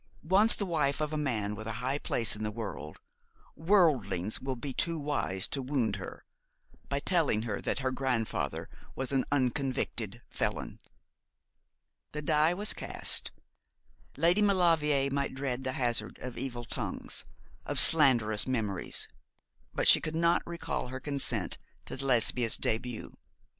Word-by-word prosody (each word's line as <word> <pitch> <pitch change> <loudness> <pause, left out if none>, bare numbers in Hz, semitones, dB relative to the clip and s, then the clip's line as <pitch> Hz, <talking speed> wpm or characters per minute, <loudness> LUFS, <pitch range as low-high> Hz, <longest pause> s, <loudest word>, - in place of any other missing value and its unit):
Once 195 +7 +4
the 200 - -2
wife 150 -6 0
of 155 0 -2
a - - 0
man 115 -9 -1
with 110 +1 -7
a 110 - -3
high 130 +4 -1
place 115 -6 +1
in 105 - -8
the 105 - -1
world, 100 -8 -6 0.6
worldlings 135 - +2
will 130 0 -3
be 130 +2 -5
too 165 +3 0
wise 145 -11 0
to 140 - -3
wound 125 -6 0
her 95 - -9 0.6
by 140 +1 0
telling 150 - +1
her 105 -4 -3
that - - -1
her 130 - +2
grandfather 130 -4 -2 0.3
was 130 0 -3
an 135 -2 +2
unconvicted 125 -5 -1
felon.' - - -3 1.3
The 150 0 -4
die 155 +4 +3
was 205 +3 +3
cast. - - 0 0.9
Lady 175 +5 +3
Maulevrier 165 -8 +3
might 140 -1 -1
dread 130 -1 -3
the 130 -1 -2
hazard 120 -3 0
of 125 -1 -7
evil 120 -3 -4
tongues, - - -4 0.4
of - - -4
slanderous 120 -9 +5
memories; 110 -7 0 0.6
but - - 0
she - - +8
could 155 - -4
not 170 +1 +3
recall 170 -6 -4
her 130 +1 -6
consent 130 -8 -2 0.3
to 135 - -4
Lesbia's 120 -2 +3
début. 115 +1 -2
130 Hz, 145 wpm, -30 LUFS, 115-150 Hz, 1.3 s, she